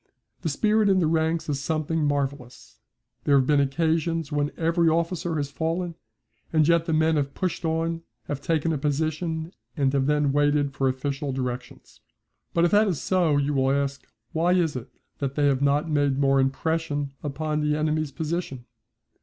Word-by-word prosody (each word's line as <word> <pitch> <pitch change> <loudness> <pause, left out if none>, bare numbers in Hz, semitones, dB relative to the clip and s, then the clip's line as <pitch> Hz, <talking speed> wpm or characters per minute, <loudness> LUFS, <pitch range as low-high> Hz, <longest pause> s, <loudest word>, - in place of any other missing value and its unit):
The 160 - -1
spirit 210 +7 +2
in 190 - +4
the 180 - +3
ranks 160 +1 0
is 145 -2 -1
something 155 +1 -1
marvellous. 140 -4 -3 0.5
There 140 -1 +5
have 130 - +3
been 145 +1 +3
occasions 160 +2 0
when 145 0 0
every 165 0 +2
officer 170 +1 -1
has 145 -2 -2
fallen 165 +3 -2 0.6
and 155 -2 +3
yet 170 -1 +3
the - - 0
men 160 0 +3
have 140 -1 -2
pushed 185 -2 -2
on, 165 +1 -1 0.2
have 140 +4 -5
taken 165 +1 0
a 150 - -2
position 160 +3 -2 0.2
and 135 -2 +2
then 140 +1 +2
waited 145 0 +2
for 135 -1 +1
official 135 +2 -3
directions. 125 -1 -6 0.5
But 170 0 +3
if 170 - +1
that 210 +1 +5
is 180 -7 -1
so, 175 -6 +2
you 145 +1 0
will 135 -1 +2
ask, 140 0 -1 0.2
why 170 +3 +2
is 170 -5 +1
it 125 - -6 0.3
that 140 -1 -2
they 145 - +2
have 140 -2 +2
not 145 +3 +2
made 145 -3 +1
more 135 -1 +3
impression 145 +1 -1
upon 150 +1 -2
the 150 0 +1
enemy's 155 -1 0
position? 155 -5 -4
150 Hz, 175 wpm, -25 LUFS, 140-165 Hz, 0.6 s, There